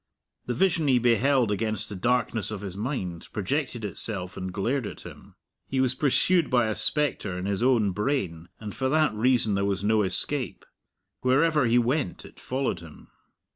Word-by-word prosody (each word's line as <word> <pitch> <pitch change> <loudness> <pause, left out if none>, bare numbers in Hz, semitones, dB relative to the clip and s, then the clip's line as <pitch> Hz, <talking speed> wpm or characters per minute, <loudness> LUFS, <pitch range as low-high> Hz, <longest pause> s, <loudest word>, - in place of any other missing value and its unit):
The 125 - -1
vision 170 0 +1
he 130 -2 +4
beheld 120 0 +2
against 110 +1 -2
the 105 - -7
darkness 120 +1 0
of 105 -3 -5
his 95 -3 -6
mind 100 - -4
projected 120 +2 -2
itself 95 -1 -4
and 95 0 -5
glared 115 +5 -1
at - - -9
him. - - -13 0.3
He 135 - -2
was 130 -1 +2
pursued 155 +5 +2
by 120 -3 +2
a - - 0
spectre 110 -9 +1
in 90 - -4
his 100 +1 -1
own 120 -5 +3
brain, 95 - -2
and 105 -2 -7
for 130 -1 -1
that 155 -1 +2
reason 115 -1 +2
there 100 0 0
was 100 -1 -1
no 110 +1 +3
escape. 95 - +1 0.5
Wherever 145 +2 +2
he 115 +1 +3
went 120 - -1
it - - -15
followed 130 -8 -2
him. 80 -3 -14
115 Hz, 175 wpm, -26 LUFS, 100-130 Hz, 0.5 s, he